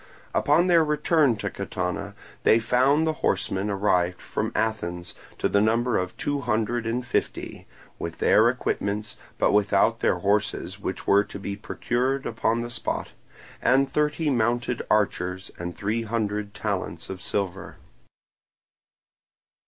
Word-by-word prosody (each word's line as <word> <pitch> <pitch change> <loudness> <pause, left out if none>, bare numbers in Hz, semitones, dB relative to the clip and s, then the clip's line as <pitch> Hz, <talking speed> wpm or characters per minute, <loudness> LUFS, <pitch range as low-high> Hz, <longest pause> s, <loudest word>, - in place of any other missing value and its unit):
Upon 155 +5 +3
their 170 -3 +5
return 150 -3 +2
to 105 - -4
Catana 95 +2 -4 0.3
they - - +5
found 130 +7 +3
the 160 - +1
horsemen 95 +2 0
arrived 90 -3 +1
from - - -3
Athens, 90 -6 -2 0.2
to - - +1
the 100 - +2
number 115 +2 +2
of 90 0 -4
two 145 -1 -1
hundred 115 -1 -1
and 120 +2 -1
fifty - - -3 0.3
(with 85 - -5
their 110 +2 +5
equipments, 105 -4 -2 0.2
but - - +3
without 105 -1 +3
their - - +2
horses 100 -1 0
which 95 -2 -4
were 100 +1 +5
to - - -8
be 100 0 -4
procured 125 +6 -1
upon 115 0 0
the 120 - -6
spot), - - -3 0.5
and 135 +1 +3
thirty 150 +1 +1
mounted 120 0 0
archers 95 -3 0
and 85 0 -5
three 110 +3 -1
hundred 105 -2 -2
talents 90 -6 -3
of 95 -1 -7
silver. 95 -1 -3
110 Hz, 135 wpm, -25 LUFS, 100-125 Hz, 0.5 s, their